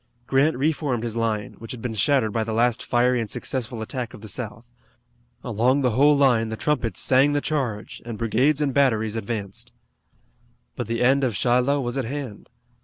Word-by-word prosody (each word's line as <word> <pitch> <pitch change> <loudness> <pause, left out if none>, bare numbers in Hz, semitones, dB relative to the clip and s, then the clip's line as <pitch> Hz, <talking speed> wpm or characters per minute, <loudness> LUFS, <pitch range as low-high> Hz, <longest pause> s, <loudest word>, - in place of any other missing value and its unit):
Grant 135 +3 +2
reformed 140 -4 0
his 115 -2 -3
line, 110 -3 -1
which 115 +4 -7
had 125 - -8
been 120 -3 -3
shattered 110 +2 +1
by 115 - 0
the 110 0 -3
last 120 +1 +2
fiery 125 0 +2
and 110 - -5
successful 120 -2 -4
attack 120 0 -5
of - - -13
the 110 - -9
South. 115 +2 -6 0.8
Along 125 +4 +1
the 125 -2 +2
whole 145 +5 +4
long 140 -1 +5
line 115 0 -3
the 110 - -4
trumpets 115 - -1
sang 135 +3 +4
the 145 - +2
charge, 130 -9 -3
and 115 -2 -6
brigades 130 +7 +1
and 140 -3 0
batteries 110 -6 +2
advanced. 105 -3 -5 1.0
But 120 - -4
the 115 +1 -1
end 135 +2 +4
of 120 -5 0
Shiloh 125 +7 +2
was 120 +1 -2
at 130 - -2
hand. 130 -4 -6
120 Hz, 190 wpm, -24 LUFS, 110-135 Hz, 1.0 s, long